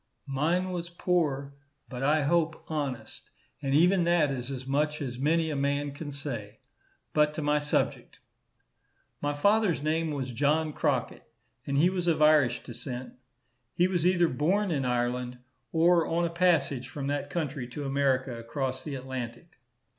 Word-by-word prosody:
Mine 165 +7 0
was 175 -1 -4
poor, 155 -6 0 0.3
but 125 -1 -7
I 150 +2 +3
hope 165 +1 +1
honest, 135 -7 -4 0.3
and 135 0 0
even 180 +4 +5
that 170 -4 +3
is 125 -1 -4
as 130 -2 -5
much 150 +3 0
as 125 -3 -5
many 160 +3 +2
a - - -2
man 140 +1 0
can 145 +2 -7
say. 120 -7 -6 0.6
But 150 0 +3
to 155 - -3
my 150 0 +2
subject. 145 0 -1 1.0
My 145 0 -1
father's 200 0 +2
name 160 +1 0
was 135 -4 -3
John 150 +4 +1
Crockett, - - -2 0.4
and 140 0 0
he 175 +5 +4
was 180 -2 -2
of 165 -2 +2
Irish 150 -5 +4
descent. 125 +1 -7 0.6
He 175 - +4
was 180 -2 +1
either 175 -2 +4
born 180 +9 +1
in 140 -4 0
Ireland 125 0 -1 0.3
or 170 +1 +4
on 170 +1 +1
a 165 - -2
passage 150 -7 +1
from 135 +2 -5
that 145 0 -2
country 140 -4 -3
to 140 +4 -6
America 135 -2 +1
across 130 +3 -3
the 145 -3 -5
Atlantic. 130 +2 -7
145 Hz, 160 wpm, -28 LUFS, 130-165 Hz, 1.0 s, even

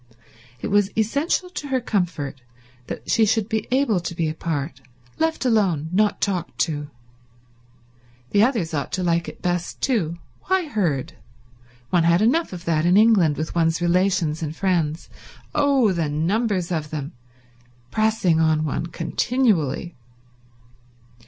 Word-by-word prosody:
It - - -3
was 205 -1 +3
essential 285 - 0
to 295 - -5
her 265 -2 +1
comfort 175 - -2 0.5
that - - -7
she 225 - +3
should 220 -1 +2
be 220 -2 -2
able 255 -6 +2
to 170 0 -5
be 165 -1 0
apart, 150 -3 -4 0.4
left 320 -3 0
alone, 190 - +2
not 210 +3 +2
talked 180 -4 -2
to. 145 -3 -1 1.4
The 205 - +4
others 220 -9 +1
ought 140 -2 -2
to 185 - -1
like 170 -1 +1
it - - -10
best 175 -1 -2
too. 175 - 0 0.3
Why 375 -1 +1
herd? 170 - -1 0.8
One 175 - +4
had 170 +4 +4
enough 320 +9 +2
of 175 -2 -8
that 155 -2 +1
in 175 +3 +4
England, 205 -9 +4
with 155 0 -3
one's 165 -1 +1
relations 175 -3 +1
and 155 -1 -4
friends—oh, 195 - 0
the 165 -4 -1
numbers 185 +4 0
of 155 -3 -2
them!—pressing 125 - -3
on 160 -1 +2
one 155 +3 -2
continually. 175 - 0
175 Hz, 135 wpm, -23 LUFS, 155-220 Hz, 1.4 s, The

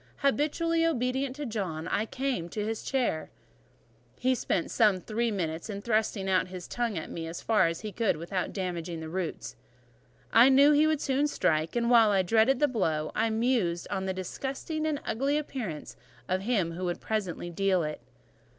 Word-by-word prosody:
Habitually 320 +4 +2
obedient 265 -3 0
to 295 0 -5
John, 190 - -3
I 215 - 0
came 260 -10 -2
up 170 - -12
to 210 -1 -2
his 225 0 -3
chair: 245 -12 -1 0.9
he 260 +1 +2
spent 190 -7 -1
some 210 -5 +4
three 230 +5 -1
minutes 170 -2 -3
in 200 -1 -5
thrusting 215 -3 0
out 185 -1 +2
his 180 -1 -8
tongue 235 -5 -2
at 160 - -5
me 165 -1 -5
as 165 +1 -6
far 210 -6 +4
as 165 0 -3
he 215 - -5
could 220 -2 0
without 175 +3 -3
damaging 175 -3 -4
the 160 0 -6
roots: 180 -1 -4 0.8
I 235 +4 +8
knew 280 +2 +7
he 300 +1 +5
would 310 -2 +1
soon 275 +2 +1
strike, 160 - 0
and 235 -1 +1
while 220 -5 +5
dreading 225 +7 +3
the 295 - +3
blow, 160 - -1
I 225 +1 +1
mused 220 -7 0
on 190 - -1
the 190 - 0
disgusting 275 - -3
and 300 -2 -1
ugly 275 +5 0
appearance 240 - -5 0.3
of 185 +1 0
him 195 -6 0
who 180 +2 -4
would 175 -1 -2
presently 190 -5 -3
deal 190 0 +1
it. 150 -3 -4
215 Hz, 185 wpm, -29 LUFS, 175-260 Hz, 0.9 s, I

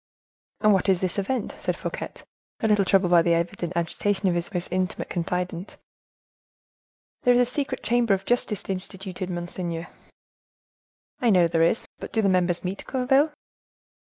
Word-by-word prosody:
"And 215 -1 +5
what 195 +1 +2
is 185 -2 +4
this 185 +1 -1
event?" 225 +4 -2
said - - -2
Fouquet, - - -4 0.5
a 220 - +2
little 210 -2 +3
troubled 185 -2 +3
by 170 -1 +7
the 170 0 +3
evident 175 +1 -2
agitation 190 +4 0
of 180 - +3
his 175 +2 -2
most 180 -2 -3
intimate 185 0 -2
confidant. 180 +1 -3 1.4
"There 245 0 +5
is - - +4
a 245 - +5
secret 260 +1 -3
chamber 235 -4 +3
of 190 0 -8
justice 235 -4 0
instituted, 190 -1 -4
monseigneur." 175 -1 -4 1.3
"I 240 - +2
know 180 -5 +5
there 165 0 +1
is, 165 +7 +2
but - - -7
do 220 - +1
the 200 - +4
members 180 -2 +1
meet, 190 +2 -4
Gourville?" 270 +4 +3
190 Hz, 160 wpm, -25 LUFS, 175-215 Hz, 1.4 s, by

